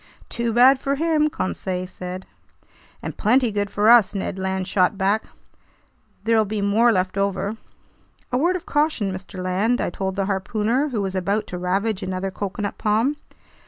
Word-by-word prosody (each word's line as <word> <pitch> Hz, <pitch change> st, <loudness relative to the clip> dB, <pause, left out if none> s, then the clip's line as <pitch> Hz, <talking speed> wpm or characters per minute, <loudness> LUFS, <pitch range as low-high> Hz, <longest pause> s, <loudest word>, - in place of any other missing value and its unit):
"Too 235 Hz, -1 st, -2 dB
bad 255 Hz, +4 st, +6 dB
for 275 Hz, +1 st, -1 dB
him!" 310 Hz, 0 st, +2 dB
Conseil 185 Hz, -, -3 dB
said. 185 Hz, 0 st, -7 dB, 0.8 s
"And -, -, -5 dB
plenty 240 Hz, +2 st, +3 dB
good 205 Hz, -1 st, -1 dB
for 205 Hz, +2 st, +1 dB
us!" 230 Hz, -3 st, +6 dB
Ned 190 Hz, -1 st, -3 dB
Land 190 Hz, 0 st, -2 dB
shot 185 Hz, 0 st, +2 dB
back. 200 Hz, +3 st, +1 dB, 1.0 s
"There'll 225 Hz, 0 st, +3 dB
be 210 Hz, +1 st, -3 dB
more 210 Hz, +4 st, +3 dB
left 185 Hz, -1 st, 0 dB
over!" 200 Hz, +2 st, -1 dB, 0.7 s
"A 250 Hz, -, +1 dB
word 350 Hz, +5 st, +2 dB
of 360 Hz, -1 st, -5 dB
caution, 295 Hz, -10 st, 0 dB
Mr. 185 Hz, +1 st, -8 dB
Land," 190 Hz, +7 st, 0 dB
I -, -, -1 dB
told 190 Hz, +1 st, -3 dB
the 195 Hz, -1 st, 0 dB
harpooner, 215 Hz, +8 st, 0 dB
who 220 Hz, -6 st, -2 dB
was 190 Hz, -1 st, -3 dB
about 195 Hz, +3 st, 0 dB
to -, -, -2 dB
ravage 195 Hz, +3 st, -1 dB
another 185 Hz, 0 st, -3 dB
coconut 205 Hz, +1 st, -4 dB
palm. 225 Hz, +7 st, +1 dB
205 Hz, 165 wpm, -22 LUFS, 190-235 Hz, 1.0 s, bad